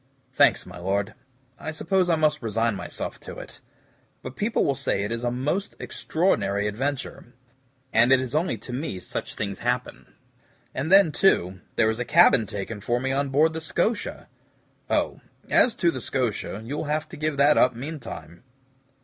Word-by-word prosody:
"Thanks, - - +4
my 90 0 -10
Lord. 100 +4 -1 0.5
I 155 - -5
suppose 180 +3 0
I 165 - +4
must 155 -1 +1
resign 115 0 0
myself - - -6
to - - -9
it; - - -10 0.6
but 130 - -7
people 215 +3 0
will 140 - +2
say 135 -7 -1
it 105 - -3
is 115 +1 -3
a 120 - +1
most 145 +11 -2
extraordinary 105 - 0
adventure, 125 +2 -4 0.6
and 120 +3 +5
it 135 - +6
is 130 -2 -4
only 155 -5 0
to 120 +4 -9
me 125 - -3
such - - -5
things 100 -2 -4
happen. 125 +1 -3 0.6
And 145 +6 -3
then, 195 -4 +7
too, 95 - +2 0.2
there 110 0 +3
is 110 - -5
a - - 0
cabin 145 - +5
taken 105 +2 -5
for 120 +4 0
me 135 +1 -1
on 140 +1 0
board 155 +4 +3
the 160 - -4
SCOTIA." 175 +7 -1 0.6
"Oh, - - 0 0.3
as 245 - +5
to 170 - +2
the - - -5
SCOTIA, 110 -5 -2
you'll 140 +7 -4
have 155 +1 -1
to - - -9
give 155 -1 -2
that 145 +2 +5
up 125 -1 +4
meantime." 120 - -8
130 Hz, 175 wpm, -25 LUFS, 110-155 Hz, 0.6 s, then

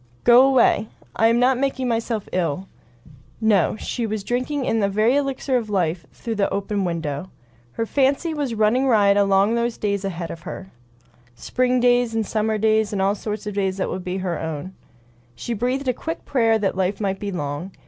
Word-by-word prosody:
"Go 240 +1 +7
away. 245 -5 +3 0.3
I 225 - +4
am 230 +1 +3
not 250 0 +3
making 270 -1 -1
myself 225 -2 -2
ill." 180 0 -1 0.7
No; 215 -5 +2
she 230 +1 -3
was 215 -1 -3
drinking 255 +5 -2
in 225 - +1
a 200 - +2
very 215 +6 +2
elixir 275 -2 0
of 225 -3 -4
life 175 -4 -1
through 230 - -5
that 200 - +1
open 200 0 -1
window. 165 -1 -3 0.4
Her 225 - -2
fancy 280 +6 +1
was 285 -6 -2
running 220 +5 +2
riot 205 -5 +4
along 200 +1 +3
those 235 0 -1
days 200 -1 -1
ahead 175 -4 -4
of 165 - -8
her. 190 +2 -8 0.6
Spring 250 - 0
days, 245 -1 +3
and 220 -1 0
summer 215 +1 0
days, 220 0 +2
and 205 - -2
all 195 +1 +2
sorts 210 0 -5
of 210 - -4
days 195 -1 -1
that 190 - -2
would 185 - -4
be 180 +1 -3
her 185 -2 -3
own. 160 +3 -5 0.6
She 235 - -4
breathed 250 +5 -1
a 255 - +2
quick 325 +7 -6
prayer 225 -4 +2
that 205 -3 -1
life 190 +1 -1
might 195 -2 -2
be 205 -1 -4
long. 145 0 -4
215 Hz, 195 wpm, -22 LUFS, 190-245 Hz, 0.7 s, Go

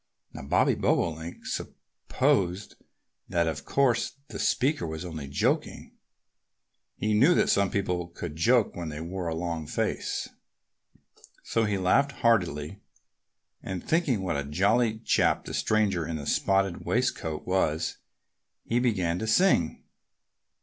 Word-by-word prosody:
Now, - - -7
Bobby 70 - +2
Bobolink 80 0 -1
supposed 95 +1 -2 0.6
that 85 -1 +1
of 80 -1 -3
course 130 -4 +1 0.2
the - - -7
speaker 135 - +1
was 80 +2 -5
only 80 -5 -6
joking. 70 +1 -1 1.0
He 110 0 -1
knew 135 +12 +5
that - - +2
some 100 -1 +2
people 90 -3 -1
could 85 -2 -7
joke 115 +7 +3
when 85 -2 -5
they 75 0 -6
wore 90 +2 -4
a 80 - -2
long 80 -2 -3
face. - - -2 1.2
So 115 -1 0
he 105 -2 0
laughed 140 +10 +2
heartily. 95 - 0 0.8
And 95 -2 -6
thinking 145 - +1
what 90 - -1
a 70 - -2
jolly 110 - +1
chap 110 - +1
the - - -7
stranger 100 -7 +1
in 85 - -3
the 75 -2 -5
spotted 95 +1 +1
waistcoat 95 -10 -1
was, 90 -4 0 0.7
he 120 - 0
began 95 -8 0
to 110 - -3
sing. 110 - +2
95 Hz, 135 wpm, -27 LUFS, 80-110 Hz, 1.2 s, knew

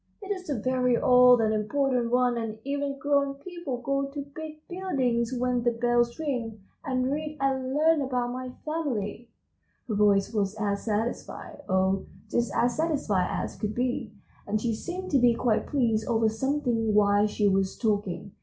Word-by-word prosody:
"It 395 - -5
is 370 -4 -4
a 285 - 0
very 250 +1 +1
old 250 -1 +6
and 220 -1 +2
important 245 +3 0
one, 250 0 +2
and 225 -2 -3
even 280 0 -2
grown 280 0 +1
people 285 -5 -6
go 275 +1 0
to 280 0 -6
big 310 -1 -8
buildings 260 -11 -1
when 250 -1 0
the 240 - +3
bells 240 0 +1
ring, 245 -8 -3 0.2
and 255 -3 0
read 305 +1 -3
and 265 -1 0
learn 315 0 +4
about 250 -2 -1
my 255 0 -5 0.2
family." 245 -8 -3 0.6
Her 225 - -2
voice 205 0 +3
was 205 -1 0
as 200 -1 -1
satisfied, 225 +6 -3
oh, 190 +1 +1 0.2
just 235 -3 +1
as 245 0 +1
satisfied 275 - +1
as - - -3
could 210 0 -3
be, 245 -3 -1 0.4
and 215 +1 0
she 230 +1 -1
seemed 365 +10 -5
to 275 - +4
be 240 -1 +4
quite 230 -2 +1
pleased 230 -6 +1
over 225 -2 +2
something 230 -2 0
while 205 0 +4
she 210 0 +1
was 195 -1 +1
talking. 205 -3 -1
245 Hz, 170 wpm, -27 LUFS, 220-280 Hz, 0.6 s, old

